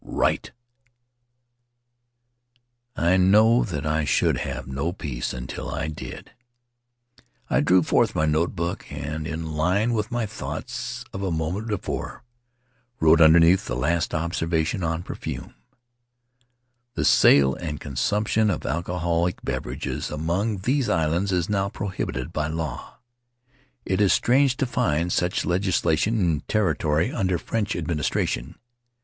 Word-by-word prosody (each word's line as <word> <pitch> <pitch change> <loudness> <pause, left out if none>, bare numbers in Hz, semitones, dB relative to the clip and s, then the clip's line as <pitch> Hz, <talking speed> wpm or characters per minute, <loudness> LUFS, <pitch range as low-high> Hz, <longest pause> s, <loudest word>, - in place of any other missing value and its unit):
Write!" - - -1 2.4
I 85 +3 +3
know 110 +6 +5
that 75 -7 -4
I 75 0 +1
should 70 - +2
have - - -4
no 70 +6 -2
peace 75 -9 -4
until 65 0 -6
I 80 +1 -3
did, 75 -3 -8 0.9
so - - -25 0.3
I 60 - +3
drew 90 +4 +4
forth - - +2
my 80 - +2
notebook 85 +2 -1
and, 75 +2 -4
in 80 0 -4
line 95 +10 +1
with 110 0 -1
my 120 -2 -1
thoughts 105 - -6
of 95 - -5
a 95 - -1
moment 85 +6 -2
before, 105 -4 -4 0.8
wrote, 80 +1 +5
underneath 80 +3 +6
the - - -2
last 80 +7 0
observa 80 0 0
tion 90 +3 -3
on 80 +1 -1
perfume: - - -6 1.4
"The - - 0
sale 70 -1 +6
and 75 -2 -5
consumption 105 +9 0
of - - -2
alcoholic 85 +1 -1
beverages - - -4
among 90 +7 -1
these 130 +5 +1
islands 85 +5 +1
is 90 -2 0
now 100 -1 0
pro 100 0 -4
hibited 65 -8 -4
by 75 0 -1
law. 80 0 -5 0.9
It 95 +2 0
is 100 - +4
strange 130 +1 +3
to 135 - +1
find 85 -8 0
such 90 0 0
legislation 90 +2 +1
in 85 -6 +1
territory 90 - +1
under 95 -4 0
French 105 +4 -2
administration. 75 -2 -2
85 Hz, 130 wpm, -24 LUFS, 80-100 Hz, 2.4 s, underneath